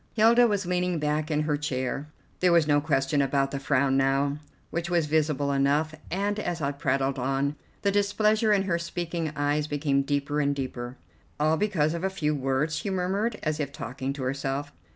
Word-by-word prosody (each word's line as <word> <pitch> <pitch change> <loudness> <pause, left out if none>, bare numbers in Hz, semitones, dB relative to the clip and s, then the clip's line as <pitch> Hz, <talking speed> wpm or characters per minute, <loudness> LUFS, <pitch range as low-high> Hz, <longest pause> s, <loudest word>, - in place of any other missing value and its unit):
Hilda 235 +2 +5
was 205 -3 0
leaning 180 0 0
back 150 0 -1
in 150 -1 +1
her 150 -1 +1
chair; 140 -1 -2 0.3
there 180 -1 +4
was 170 -2 +5
no 145 -1 +4
question 140 -1 +1
about 135 0 +1
the 140 - -3
frown 135 -1 +2
now, 135 +2 +1 0.3
which 170 +1 -2
was 170 -2 +2
visible 150 -2 +1
enough, 140 +3 +2 0.2
and, 205 +3 -1
as 175 -5 -2
I 140 -2 0
prattled 135 -1 0
on, 135 +3 0 0.3
the 200 - +3
displeasure 215 +2 +2
in 200 -2 +3
her 170 -3 0
speaking 170 -1 -3
eyes 145 +1 0
became 145 -2 +1
deeper 145 +1 -1
and 140 -1 +1
deeper. 130 -2 -5 0.4
"All 155 +1 +3
because 165 -5 +1
of 170 +1 -4
a 190 - +1
few 150 -6 -1
words!" 135 +2 0
she 205 - -3
murmured, 195 +4 -1
as 155 -1 -1
if 140 -2 -2
talking 135 -1 -4
to 140 -2 -6
herself. 135 +2 -2
150 Hz, 190 wpm, -27 LUFS, 140-175 Hz, 0.4 s, Hilda